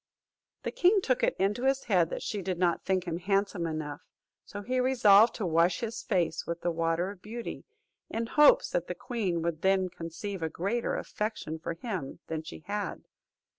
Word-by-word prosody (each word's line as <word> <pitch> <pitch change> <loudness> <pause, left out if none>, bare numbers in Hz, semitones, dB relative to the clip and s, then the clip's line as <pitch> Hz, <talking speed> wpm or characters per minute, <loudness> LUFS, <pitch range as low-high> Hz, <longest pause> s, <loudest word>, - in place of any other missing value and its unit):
The - - -2
king 385 +3 +4
took 255 -9 0
it - - +2
into 200 +5 +1
his 270 0 +2
head 180 -6 +2
that - - -5
she 205 -2 -3
did 185 -1 -2
not 175 -1 +1
think 185 -2 +1
him 170 -2 -3
handsome 195 -2 0
enough; 155 -2 -4 0.4
so 205 0 -8
he 255 +4 0
resolved 235 -4 +6
to 215 - -2
wash 170 +1 +2
his 230 0 -3
face 180 -6 0
with 170 0 -3
the 175 - 0
water 165 +3 0
of 195 -3 -13
beauty, 230 +3 -6 0.4
in 230 +1 -2
hopes 300 - +5
that - - -1
the - - -4
queen 195 -9 -2
would 165 -2 -2
then 190 -1 +2
conceive 175 +3 -6
a 160 - -1
greater 200 +9 -1
affection 210 -7 -4
for 165 +1 -4
him 180 - -5
than 160 -1 -3
she 160 - -10
had. 205 0 -3
190 Hz, 190 wpm, -29 LUFS, 170-225 Hz, 0.4 s, resolved